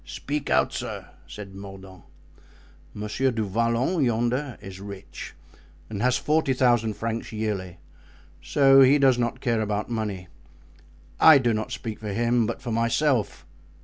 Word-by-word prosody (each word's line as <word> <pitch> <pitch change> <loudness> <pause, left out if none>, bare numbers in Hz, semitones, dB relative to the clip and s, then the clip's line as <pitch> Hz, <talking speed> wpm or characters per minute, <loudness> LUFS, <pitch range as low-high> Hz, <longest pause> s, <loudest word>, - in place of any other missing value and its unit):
"Speak 145 - -5
out, - - +2
sir," - - -6 0.2
said 100 -2 -9
Mordaunt. 95 -1 -11 0.9
"Monsieur 105 +5 -1
du 115 -3 -2
Vallon, 115 - 0
yonder, 120 +2 -1
is 95 -1 -10
rich 100 -1 -9 0.6
and 100 -2 -4
has 125 +1 +2
forty 150 -1 +1
thousand 120 -4 +2
francs 115 +2 -4
yearly, 105 -5 -4 0.6
so 135 -1 +5
he 135 +2 +6
does 135 -3 +3
not 120 -1 -2
care 115 -4 0
about 105 +1 -2
money. 105 -5 -3 0.9
I 160 -2 +8
do 120 -4 +1
not 110 0 -3
speak 110 -2 -6
for 105 -2 -5
him, 120 +1 +1
but - - -5
for 120 - -4
myself." 115 +1 0
115 Hz, 145 wpm, -25 LUFS, 105-130 Hz, 0.9 s, I